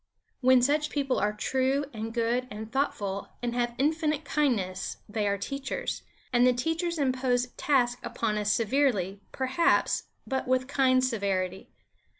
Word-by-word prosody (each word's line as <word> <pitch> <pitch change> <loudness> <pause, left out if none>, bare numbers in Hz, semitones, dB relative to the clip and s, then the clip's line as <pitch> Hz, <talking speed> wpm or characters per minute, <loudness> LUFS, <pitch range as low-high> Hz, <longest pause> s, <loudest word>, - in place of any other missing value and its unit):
When 255 -1 +5
such 300 +3 +2
people 275 -3 0
are 210 +1 +1
true 265 +6 0
and 220 0 -4
good 240 +2 0
and 215 +1 -7
thoughtful 205 -8 -1 0.2
and 240 -1 -1
have 240 -1 -1
infinite 305 +1 +1
kindness, 215 -12 0
they 210 0 -1
are 200 0 +1
teachers; 275 +7 -4 0.3
and 240 0 +5
the 250 - +5
teachers 325 +7 -1
impose 255 -3 +1
tasks 245 -4 +1
upon 215 -2 -1
us 210 0 +1
severely, 210 -5 +1
perhaps, 265 +5 +2 0.2
but 265 -1 -2
with 255 0 +2
kind 260 -2 +3
severity. 195 -6 -2
250 Hz, 145 wpm, -28 LUFS, 215-275 Hz, 0.3 s, When